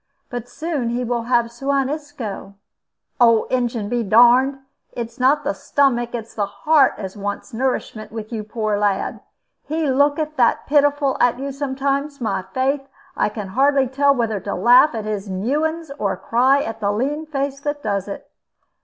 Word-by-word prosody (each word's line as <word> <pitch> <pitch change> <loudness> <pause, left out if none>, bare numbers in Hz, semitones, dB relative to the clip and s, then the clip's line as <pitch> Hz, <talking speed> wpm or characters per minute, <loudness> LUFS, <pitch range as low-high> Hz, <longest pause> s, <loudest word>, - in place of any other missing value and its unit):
But 245 -1 -5
soon 305 -7 -3
he 240 +1 -1
will 240 -1 -2
have 235 -1 +1
Suan 275 +2 0
Isco." 275 -10 -6 0.6
"Old 230 -2 +4
Injun 240 -4 -1
be 240 +2 -1
darned! 245 +5 +5 0.4
It's 230 0 -6
not 265 +4 +3
the - - -1
stomach, 240 -4 0
it's 230 -1 -7
the 205 -2 -1
heart 295 +6 +3
as 190 -2 -6
wants 205 +1 -5
nourishment 235 -3 -2
with 220 +1 -7
yon 215 -2 -4
poor 215 -1 -1
lad. 205 -2 0 0.5
He 310 -2 0
looketh 290 +3 +1
that 240 -2 +2
pitiful 290 -1 +2
at 245 0 +3
you 275 +2 -4
sometimes, 280 +1 -2
my 225 -5 -1
faith, 270 +5 0 0.3
I - - +1
can 205 -2 -6
hardly 275 +5 +3
tell 280 +2 +3
whether 225 -4 -1
to 200 - -4
laugh 245 +3 +5
at 220 -2 -4
his 210 -2 -4
newings 300 - -1
or 195 -2 -1
cry 260 +4 +2
at 225 0 -5
the 200 -1 0
lean 285 +9 -2
face 275 -2 -3
that 290 0 -4
does 200 -2 -1
it." 200 - -7
245 Hz, 170 wpm, -21 LUFS, 220-280 Hz, 0.6 s, darned